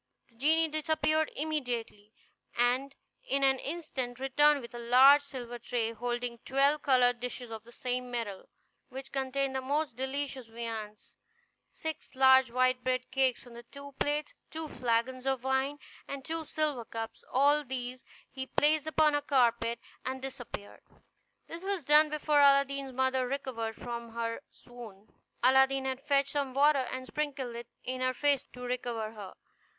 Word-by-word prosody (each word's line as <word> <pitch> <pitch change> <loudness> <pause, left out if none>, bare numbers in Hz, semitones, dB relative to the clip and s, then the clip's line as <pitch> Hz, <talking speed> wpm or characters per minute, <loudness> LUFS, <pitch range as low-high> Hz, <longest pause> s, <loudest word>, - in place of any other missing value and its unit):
The 235 - -27
genie 320 +6 +3
disappeared 310 0 +1
immediately, 245 -9 -3 0.5
and 250 +3 +2 0.3
in 275 0 0
an 265 -1 +4
instant 275 -6 -4
returned 290 +2 +3
with 235 0 -10
a 240 - -6
large 260 +5 +7
silver 245 -4 -7
tray, 230 -1 -1
holding 240 0 -3
twelve 280 +3 +2
covered 250 -3 +3
dishes 245 -1 -6
of 220 -1 -7
the 235 - -14
same 250 +1 -3
metal, 230 -6 -5 0.4
which 265 +1 -8
contained 270 0 -1
the 265 - 0
most 285 -1 -1
delicious 265 -1 -3
viands; 225 -2 -7 0.6
six 315 -3 -7
large 265 -1 +6
white 255 +1 +2
bread 255 0 -1
cakes 260 -2 +1
on 235 -1 -11
two 280 0 -10
plates, 295 +1 -1 0.2
two 320 0 -4
flagons 255 0 -1
of 265 -2 0
wine, 265 +2 0 0.3
and 275 -1 -6
two 325 0 -3
silver 300 -5 -1
cups. 225 0 -7
All 285 +3 +4
these 255 -1 -5 0.2
he 265 -1 -6
placed 305 +2 +2
upon 310 -1 +3
a 290 - +1
carpet, 235 -4 +2 0.2
and 260 +1 -3
disappeared; 245 -6 -8 0.6
this 330 +1 -8
was 390 -3 -2
done 300 +2 +6
before 300 0 +1
Aladdin's 275 -1 +4
mother 260 0 +1
recovered 245 -4 -3
from 235 -1 -6
her 230 +1 -3
swoon. 225 -5 -13 0.3
Aladdin 265 +1 +4
had 260 0 -2
fetched 280 -1 +1
some 275 -3 -2
water, 280 -2 +4
and 255 0 -5
sprinkled 270 -4 -3
it 235 0 -7 0.2
in 255 0 -4
her 255 0 +1
face 285 -2 +2
to 250 - -10
recover 240 -3 -3
her. 205 -4 -10
260 Hz, 155 wpm, -31 LUFS, 240-280 Hz, 0.6 s, large